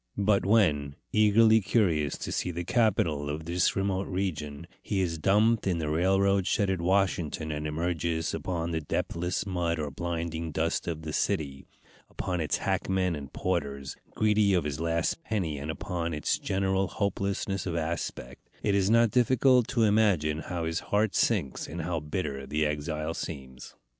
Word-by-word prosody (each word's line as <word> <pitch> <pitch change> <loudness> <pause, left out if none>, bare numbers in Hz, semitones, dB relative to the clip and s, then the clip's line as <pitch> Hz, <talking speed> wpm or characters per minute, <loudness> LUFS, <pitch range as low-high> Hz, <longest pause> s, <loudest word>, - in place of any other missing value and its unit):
But 100 -1 +2
when, 75 -10 +3 0.2
eagerly 110 +1 +5
curious 85 -9 +1
to - - -5
see - - -1
the 85 0 -3
capital 85 - +1
of 75 +2 -4
this 85 +2 +1
remote 95 0 -1
region, 80 -5 -3 0.2
he 100 - -2
is 85 -3 -1
dumped 105 +6 +3
in 90 -3 +1
the 75 -2 -2
railroad 95 +3 +2
shed 100 -2 +1
at 95 -3 -2
Washington, 85 -4 0
and 75 0 -3
emerges 80 0 -1
upon 85 -2 -2
the 80 -1 -1
depthless 85 +5 -2
mud 85 -3 -1
or 75 -2 -3
blinding 85 +1 -3
dust 80 +2 -1
of 80 -2 -3
the 75 -1 -5
city, 70 -3 -1 0.4
upon 90 -2 -3
its 75 - 0
hackmen 95 -2 0
and 70 -2 -8
porters, 70 -7 -2 0.2
greedy 105 -2 +3
of 90 - +2
his 75 0 -3
last 85 - -1
penny, 90 - -2
and 70 +2 -6
upon 85 0 -3
its 75 - 0
general 95 0 0
hopelessness 100 0 -2
of 85 - -2
aspect, 80 -6 -4
it 105 - +2
is 100 0 +2
not 115 0 +4
difficult 125 0 +4
to 120 -4 +1
imagine 100 -8 +3
how 85 +1 -4
his 80 +1 -1
heart 105 0 +2
sinks 70 - 0
and 80 +2 -5
how 85 0 -1
bitter 75 -3 -4
the 75 +1 0
exile 75 +1 -2
seems. 65 -7 -7
85 Hz, 165 wpm, -28 LUFS, 75-100 Hz, 0.4 s, eagerly